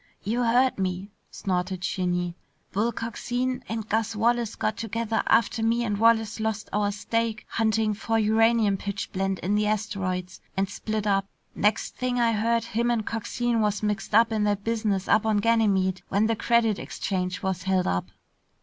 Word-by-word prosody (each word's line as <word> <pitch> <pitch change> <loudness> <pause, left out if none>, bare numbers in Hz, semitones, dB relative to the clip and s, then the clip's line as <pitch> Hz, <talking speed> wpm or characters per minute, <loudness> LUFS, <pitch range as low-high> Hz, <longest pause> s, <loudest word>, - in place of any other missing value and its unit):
"You 230 +5 0
heard 245 0 +3
me," 190 +2 -2 0.2
snorted 185 -1 -2
Shinny. 180 -2 -1 0.4
"Bull 220 +4 +1
Coxine 245 +3 -3
and 220 -1 -3
Gus 220 0 0
Wallace 235 0 +1
got 215 - -1
together 225 0 -1
after 230 0 +3
me 230 +2 +2
and 205 -3 -1
Wallace 225 -1 +3
lost 220 -1 -2
our 205 0 +1
stake 220 +1 -2
hunting 220 -1 +1
for 225 +2 -1
uranium 220 -1 +3
pitchblende 195 -1 -3
in 190 +4 0
the 210 0 +2
asteroids 190 -4 -2 0.2
and 195 0 +2
split 215 +1 -3
up. 195 -1 +1 0.3
Next 210 +1 0
thing 250 -1 -1
I 235 -1 +3
heard, 230 +2 +1
him 235 +1 -1
and 230 -3 0
Coxine 235 +1 -1
was 210 -1 0
mixed 210 0 -1
up 230 +1 +5
in 215 -1 +1
that 205 -1 0
business 215 -4 -1
up 215 - +4
on 220 -1 +2
Ganymede 200 -4 +2
when 200 +3 +2
the 225 +1 +1
Credit 225 -2 +2
Exchange 185 -2 -3
was 190 -2 -1
held 185 0 +1
up." 90 0 -1
215 Hz, 165 wpm, -26 LUFS, 195-230 Hz, 0.4 s, up